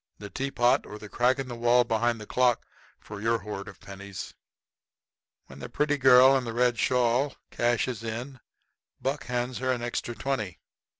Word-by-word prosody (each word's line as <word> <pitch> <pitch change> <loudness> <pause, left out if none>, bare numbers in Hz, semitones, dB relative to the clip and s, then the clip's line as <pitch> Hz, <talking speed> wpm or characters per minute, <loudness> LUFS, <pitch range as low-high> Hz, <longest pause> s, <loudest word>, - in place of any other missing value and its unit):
The 100 -1 -9
tea 135 +1 -3
pot 120 -2 +2
or 105 - -8
the 105 -1 -11
crack 125 +4 +2
in 135 -1 -4
the 125 - -6
wall 120 +1 +4
behind 115 0 0
the 105 - -8
clock 125 +1 +1 0.3
for 105 -1 -9
your 115 +1 +2
hoard 100 -1 -7
of 95 - -11
pennies." 100 -1 -9 1.1
When 65 - -13
the - - -7
pretty 150 -1 0
girl 130 +1 +7
in 130 - +1
the 115 -2 -5
red 120 -1 +1
shawl 125 +2 +1 0.2
cashes 120 -1 0
in 120 +4 -6 0.6
Buck 140 +2 -3
hands 125 0 -2
her 130 0 0
an 120 -2 -2
extra 120 0 -3
twenty. 110 -10 -3
120 Hz, 180 wpm, -27 LUFS, 110-130 Hz, 1.1 s, girl